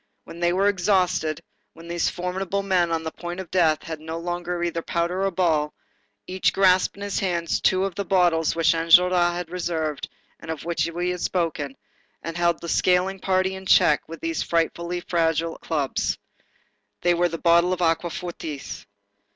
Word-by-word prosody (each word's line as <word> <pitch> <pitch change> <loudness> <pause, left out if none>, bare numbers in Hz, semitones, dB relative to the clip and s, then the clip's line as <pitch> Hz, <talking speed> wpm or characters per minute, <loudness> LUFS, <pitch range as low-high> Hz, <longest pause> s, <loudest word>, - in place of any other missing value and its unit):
When 165 - -11
they 175 0 +2
were 190 +3 +2
exhausted, 185 -5 +1 0.3
when 165 +1 -13
these 170 0 0
formidable 190 +2 -3
men 180 -3 +1
on 165 -1 -1
the 160 - -4
point 175 +2 -7
of 185 -3 -8
death 160 -4 +2
had 160 -2 -6
no 160 +1 -6
longer 175 0 -3
either 170 -1 -1
powder 170 +3 -1
or - - +2
ball, 160 -5 0 0.5
each 185 0 0
grasped 185 -1 +3
in 200 - -7
his 205 -1 -2
hands 170 -3 -1
two 190 0 +3
of 195 - -3
the 200 - -3
bottles 175 -4 +2
which 165 +1 +3
Enjolras 175 +1 +4
had 175 -1 -5
reserved, 165 -4 -3 0.3
and - - -11
of 160 -1 -5
which 170 0 0
we 175 +2 -1
have 180 -1 -5
spoken, 155 -6 -2 0.5
and 165 +1 -5
held 170 0 +1
the 170 - -6
scaling 185 +3 +2
party 185 0 +1
in 190 0 -8
check 150 - +5
with 165 - -8
these 330 0 -2
frightfully 170 +1 -1
fragile 165 -1 0
clubs. 145 -5 -1 0.9
They 175 0 +4
were 175 0 +2
bottles 170 +2 +3
of 180 - -4
aquafortis. 165 -3 -3
175 Hz, 175 wpm, -24 LUFS, 165-180 Hz, 0.9 s, check